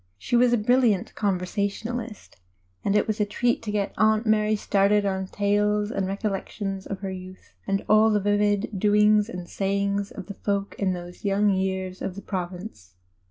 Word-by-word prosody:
She 170 Hz, -, -2 dB
was 245 Hz, 0 st, +5 dB
a 240 Hz, -, +4 dB
brilliant 230 Hz, -3 st, +2 dB
conversationalist, 205 Hz, +4 st, -3 dB, 0.5 s
and 200 Hz, -, +1 dB
it 210 Hz, -, +3 dB
was 215 Hz, -1 st, -2 dB
a -, -, +4 dB
treat 235 Hz, +4 st, 0 dB
to 210 Hz, -, -4 dB
get 205 Hz, -1 st, -1 dB
Aunt 215 Hz, +1 st, +3 dB
Mary 215 Hz, 0 st, +3 dB
started 205 Hz, 0 st, +2 dB
on 190 Hz, -1 st, -1 dB
tales 205 Hz, +1 st, +1 dB
and 195 Hz, -5 st, -1 dB
recollections 195 Hz, 0 st, -3 dB
of 195 Hz, -1 st, -5 dB
her 195 Hz, -1 st, -3 dB
youth, 185 Hz, 0 st, -10 dB
and 195 Hz, 0 st, -1 dB
alt 215 Hz, +1 st, +5 dB
the 210 Hz, -, +3 dB
vivid 205 Hz, 0 st, +1 dB
doings 210 Hz, +1 st, +4 dB
and 180 Hz, -6 st, -7 dB
sayings, 200 Hz, +1 st, -1 dB
of 195 Hz, -, -8 dB
the 200 Hz, -, -7 dB
folk 200 Hz, 0 st, -2 dB
in 190 Hz, -2 st, +1 dB
those 175 Hz, 0 st, -9 dB
young 200 Hz, 0 st, +2 dB
years 190 Hz, -1 st, -2 dB
of 180 Hz, -, -4 dB
the 200 Hz, -, -8 dB
Province. 180 Hz, -, -6 dB
200 Hz, 175 wpm, -25 LUFS, 190-210 Hz, 0.5 s, was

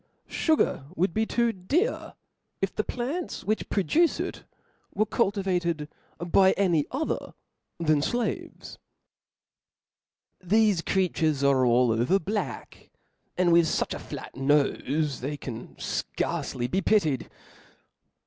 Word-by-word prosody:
Sugar 315 Hz, -, +1 dB
would 175 Hz, 0 st, +1 dB
be 220 Hz, 0 st, 0 dB
too 235 Hz, -1 st, +1 dB
dear, 300 Hz, -, -1 dB, 0.4 s
if 195 Hz, -1 st, -1 dB
the 215 Hz, -, 0 dB
plants 275 Hz, +11 st, -4 dB
which 215 Hz, +1 st, -1 dB
produce 315 Hz, -, +2 dB
it -, -, -5 dB, 0.5 s
were 215 Hz, +1 st, +2 dB
cultivated 185 Hz, -8 st, 0 dB, 0.3 s
by 190 Hz, +2 st, +4 dB
any 175 Hz, -7 st, +1 dB
other 295 Hz, +5 st, -3 dB, 0.4 s
than 155 Hz, -3 st, +2 dB
flaves. 240 Hz, +10 st, -3 dB, 1.6 s
Thefe 205 Hz, -2 st, +3 dB
creatures 160 Hz, -6 st, +1 dB
are 135 Hz, -2 st, +4 dB
all 120 Hz, 0 st, +4 dB
over 120 Hz, +12 st, +2 dB
black, 205 Hz, +4 st, -5 dB, 0.5 s
and 175 Hz, -2 st, +3 dB
with 170 Hz, -1 st, +5 dB
fuch -, -, -1 dB
a -, -, -5 dB
flat -, -, -8 dB
nofe, 145 Hz, +1 st, +1 dB
that -, -, -15 dB
they 145 Hz, +3 st, -3 dB
can 120 Hz, -5 st, -8 dB
fcarc^ly 120 Hz, 0 st, -3 dB
be 190 Hz, -, +1 dB
pitied. 160 Hz, -, +1 dB
180 Hz, 120 wpm, -27 LUFS, 145-215 Hz, 1.6 s, with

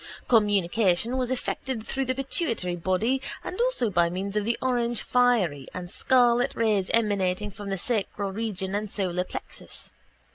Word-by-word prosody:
Communication 205 Hz, 0 st, +3 dB
was 255 Hz, -2 st, 0 dB
effected 260 Hz, -2 st, -3 dB
through 270 Hz, 0 st, -2 dB
the 255 Hz, 0 st, -1 dB
pituitary 255 Hz, -, -1 dB
body 190 Hz, +10 st, 0 dB, 0.2 s
and 370 Hz, -, -4 dB
also 480 Hz, -, +1 dB
by 170 Hz, -2 st, +3 dB
means 195 Hz, +3 st, -4 dB
of 210 Hz, -1 st, 0 dB
the 235 Hz, +1 st, 0 dB
orangefiery 240 Hz, -, +1 dB
and 180 Hz, -1 st, -5 dB
scarlet 245 Hz, 0 st, +3 dB
rays 210 Hz, -4 st, +1 dB
emanating 205 Hz, -2 st, +1 dB
from 200 Hz, +1 st, -8 dB
the 195 Hz, -, -1 dB
sacral 200 Hz, -1 st, -2 dB
region 195 Hz, -2 st, -3 dB
and 210 Hz, +1 st, -2 dB
solar 180 Hz, -3 st, -1 dB
plexus. -, -, -9 dB
210 Hz, 145 wpm, -26 LUFS, 190-245 Hz, 0.2 s, Communication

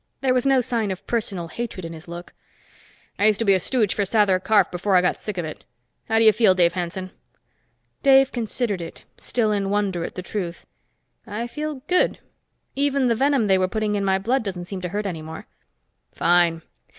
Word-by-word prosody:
There 260 Hz, -2 st, +2 dB
was 255 Hz, +1 st, +1 dB
no 270 Hz, -1 st, +4 dB
sign 235 Hz, -4 st, -1 dB
of 190 Hz, -1 st, -5 dB
personal 195 Hz, -7 st, -2 dB
hatred 220 Hz, -3 st, -5 dB
in 165 Hz, -, -6 dB
his 160 Hz, +1 st, -11 dB
look. 170 Hz, +1 st, -9 dB, 0.9 s
"I 205 Hz, -, +4 dB
used 215 Hz, -2 st, +3 dB
to 230 Hz, -, -1 dB
be 200 Hz, -, +5 dB
a 190 Hz, -, +3 dB
stooge 215 Hz, +1 st, +1 dB
for -, -, -2 dB
Sather 195 Hz, -2 st, +2 dB
Karf, 205 Hz, -4 st, +3 dB
before 185 Hz, +2 st, 0 dB
I 180 Hz, -, +6 dB
got 180 Hz, -, 0 dB
sick 210 Hz, -3 st, -5 dB
of 175 Hz, -, -2 dB
it. 155 Hz, -, -8 dB, 0.5 s
How 225 Hz, -, +2 dB
do 225 Hz, -, +4 dB
you 220 Hz, -, +9 dB
feel, 210 Hz, -4 st, +4 dB
Dave 170 Hz, -2 st, +3 dB
Hanson?" 185 Hz, +1 st, -4 dB, 0.9 s
Dave 270 Hz, -1 st, +5 dB
considered 225 Hz, -4 st, -2 dB
it, 165 Hz, -, -9 dB, 0.2 s
still 225 Hz, -3 st, 0 dB
in 200 Hz, -2 st, 0 dB
wonder 200 Hz, -4 st, 0 dB
at -, -, -6 dB
the 185 Hz, -, -5 dB
truth. 180 Hz, -4 st, -5 dB, 0.6 s
"I 220 Hz, +2 st, -4 dB
feel 295 Hz, +1 st, -5 dB
good. 360 Hz, 0 st, +2 dB, 0.6 s
Even 275 Hz, -2 st, +1 dB
the 230 Hz, -, +2 dB
venom 270 Hz, -1 st, +2 dB
they 190 Hz, -2 st, +3 dB
were 185 Hz, -, +2 dB
putting 215 Hz, +2 st, -1 dB
in 205 Hz, -1 st, 0 dB
my 190 Hz, -1 st, +2 dB
blood 235 Hz, +8 st, 0 dB
doesn't 185 Hz, -4 st, -5 dB
seem 190 Hz, 0 st, -6 dB
to 180 Hz, -, -4 dB
hurt 205 Hz, +3 st, -3 dB
any 170 Hz, -5 st, -4 dB
more." 160 Hz, +1 st, -8 dB, 0.7 s
"Fine. 170 Hz, -2 st, +2 dB
205 Hz, 210 wpm, -23 LUFS, 180-235 Hz, 0.9 s, you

